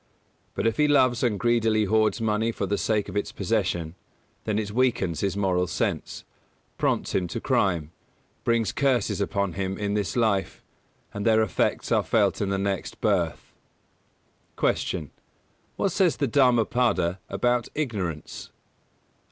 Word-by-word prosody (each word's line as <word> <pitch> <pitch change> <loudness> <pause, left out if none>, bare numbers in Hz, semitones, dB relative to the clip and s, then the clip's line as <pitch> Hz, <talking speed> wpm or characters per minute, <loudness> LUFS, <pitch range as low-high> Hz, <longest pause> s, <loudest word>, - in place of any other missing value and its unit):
But - - -2
if 115 - +1
he 150 -1 +4
loves 130 -4 +3
and 110 -6 +1
greedily 115 -3 +2
hoards 110 +2 +2
money 110 0 0
for 100 - -3
the 100 +1 -1
sake 105 -2 0
of 95 - -8
its 105 0 -1
possession, 95 -6 -1 0.5
then 110 -1 0
it 105 -1 -2
weakens 115 -8 +1
his 100 -1 -1
moral 90 -2 +1
sense, - - -3 0.6
prompts - - 0
him 90 -2 0
to - - -4
crime, 85 -5 0 0.5
brings 115 -4 +1
curses 130 -7 +1
upon 100 -2 -1
him 95 +1 -3
in 100 -1 -2
this 105 -4 -1
life, 110 -5 0 0.5
and 105 - -4
their 110 0 +4
effects 110 - -1
are - - +4
felt - - +1
in 100 - 0
the 100 - 0
next 100 0 -3
birth. 95 -7 -1 1.0
216. 90 - 0
Q. 75 -4 -11 0.7
_What 195 - +1
says 180 -2 +2
the 140 - +1
"Dhammapada" 120 - +2
about 120 +4 +1
ignorance? 100 - -4
105 Hz, 150 wpm, -25 LUFS, 95-115 Hz, 1.0 s, he